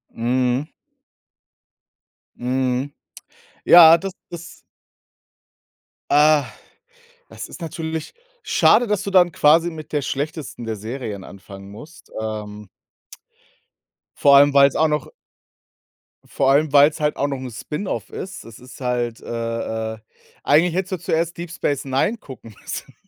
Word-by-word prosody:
Mhm. 125 +4 0 1.7
Mhm. 130 +2 -2 0.7
Ja, 165 -1 +9
das 195 +3 -6 0.2
das 170 -1 -10 1.5
Ah, 150 0 +4 0.8
das - - -8
ist - - -12
natürlich 160 -1 -5 0.3
schade, 240 +3 +3
dass 205 -2 -1
du 200 - -4
dann 180 -2 +4
quasi 165 +2 +3
mit 155 -2 -11
der 150 -2 0
schlechtesten 140 -2 -5
der 110 -1 -3
Serien 110 -2 -6
anfangen 100 +1 -12
musst. 150 +11 -14
Ähm 105 -1 -6 1.5
vor 140 -1 +5
allem, 145 +1 +6
weil's 140 -1 +5
auch 160 - +3
noch 150 -3 -2 1.2
vor 135 -1 +1
allem, 145 +1 +2
weil's 145 +2 +5
halt 150 -1 0
auch 140 - 0
noch 140 -1 -3
'n 130 -1 -7
Spin-off 150 - -5
ist. 185 0 -8
Es 115 -2 -13
ist 125 +2 -14
halt 120 -2 -2
äh, 115 -1 -4
äh, - - -10 0.5
eigentlich 160 +4 +3
hättest 190 0 -2
du - - -1
zuerst 165 +2 -2
Deep 170 -1 -7
Space 145 -5 -2
Nine 135 - 0
gucken 125 - -13
müssen. - - -8
140 Hz, 130 wpm, -21 LUFS, 120-160 Hz, 1.7 s, Ja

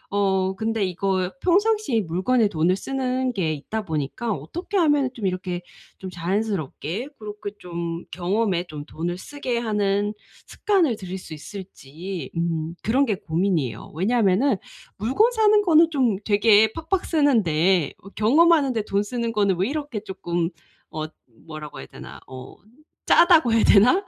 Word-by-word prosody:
어 190 -1 +1
근데 225 0 -1
이거 185 0 -1
평상시에 400 - +2
물건에 200 +7 +1
돈을 170 +1 +1
쓰는 260 +1 -2
게 165 -6 0
있다 215 +9 -4
보니까 160 - -3
어떻게 260 - -6
하면은 295 -6 +3
좀 220 - -5
이렇게 185 -1 -2 0.4
좀 190 - -7
자연스럽게 185 - -3
그렇게 210 -1 -7
좀 170 -2 -5
경험에 185 0 0
좀 150 -1 -7
돈을 175 +3 -4
쓰게 255 +1 -4
하는 205 -2 0 0.3
습관을 345 - +1
들일 190 -2 -6
수 165 -3 -10
있을지 180 0 -8
음 165 -1 -2
그런 260 +6 +2
게 215 -6 0
고민이에요. 165 - -2
왜냐면은 210 - +2 0.4
물건 270 - +2
사는 430 -2 +4
거는 330 -2 +5
좀 250 -9 +1
되게 210 +1 +5
팍팍 330 +3 -2
쓰는데 190 - +2
어 195 - -11
경험하는데 270 +2 +3
돈 200 -1 0
쓰는 235 +1 -3
거는 200 -3 +2
왜 190 - +2
이렇게 285 -7 -4
쪼끔 175 -4 -2 0.4
어 155 -1 -4 0.4
뭐라고 155 -2 -8
해야 65 - -9
되나. - - -11
어 130 -1 -10 0.5
짜다고 335 -8 +6
해야 225 - +4
되나? 210 +5 +6
205 Hz, 300 characters per minute, -23 LUFS, 175-255 Hz, 0.5 s, 짜다고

